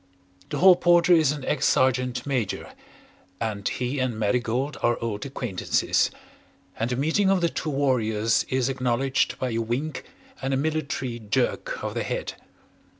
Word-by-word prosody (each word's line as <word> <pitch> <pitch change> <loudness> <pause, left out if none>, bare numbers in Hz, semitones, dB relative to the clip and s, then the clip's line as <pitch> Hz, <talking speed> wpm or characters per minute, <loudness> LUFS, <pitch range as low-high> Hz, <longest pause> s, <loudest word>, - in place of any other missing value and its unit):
The - - -3
Hall 185 0 +8
Porter 175 0 +4
is 160 -5 +4
an 145 -3 -5
ex 150 - -1
Sergeant 125 -1 +1
Major, 130 -7 -2 0.7
and 105 -3 -2
he 125 +3 -2
and 125 -3 -1
Marigold 120 +6 0
are 120 0 +2
old 110 0 -3
acquaintances, 120 -8 0 0.7
and 115 - 0
the 125 - -1
meeting 160 +9 +2
of 195 -1 +3
the 170 - +2
two 160 - -4
warriors 115 -6 +1
is 130 -1 +1
acknowledged 130 0 0
by 130 -1 -2
a 115 - -2
wink 125 +7 -3 0.4
and 135 0 0
a - - +1
military 140 -5 -2
jerk 110 -1 -1
of - - -3
the - - -2
head. - - -3
130 Hz, 155 wpm, -25 LUFS, 115-145 Hz, 0.7 s, Hall